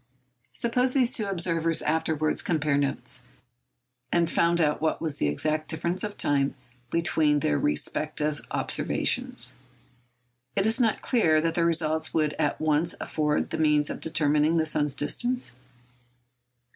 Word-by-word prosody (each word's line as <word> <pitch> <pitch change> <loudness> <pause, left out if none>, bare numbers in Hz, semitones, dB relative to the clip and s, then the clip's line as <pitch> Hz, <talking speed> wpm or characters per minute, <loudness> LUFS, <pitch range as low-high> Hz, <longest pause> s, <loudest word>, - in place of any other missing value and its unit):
Suppose 250 +2 0
these 255 -3 +2
two 215 - -1
observers 165 -3 +1
afterwards 155 -1 0
compared 150 -4 +1
notes, 130 -2 -2 0.9
and 170 -1 +2
found 170 +1 +2
out 150 -2 +1
what 160 - 0
was 155 -4 -4
the - - 0
exact 155 - -1
difference 170 +3 -2
of 210 -1 -5
time 140 -1 +1 0.3
between 160 -2 +2
their 75 - +1
respective 150 - -1
observations. - - -1 1.0
Is 195 - +2
it 225 +4 +1
not 225 -2 +1
clear 165 - +3
that 165 0 0
the 170 0 +1
result 160 -1 0
would 155 -2 +1
at 150 -2 0
once 155 +2 +1
afford 150 -1 -1
the - - -3
means 150 -1 +2
of - - -6
determining 155 0 +2
the 160 - +2
sun's 150 -2 0
distance? 240 - -1
155 Hz, 140 wpm, -26 LUFS, 150-170 Hz, 1.0 s, clear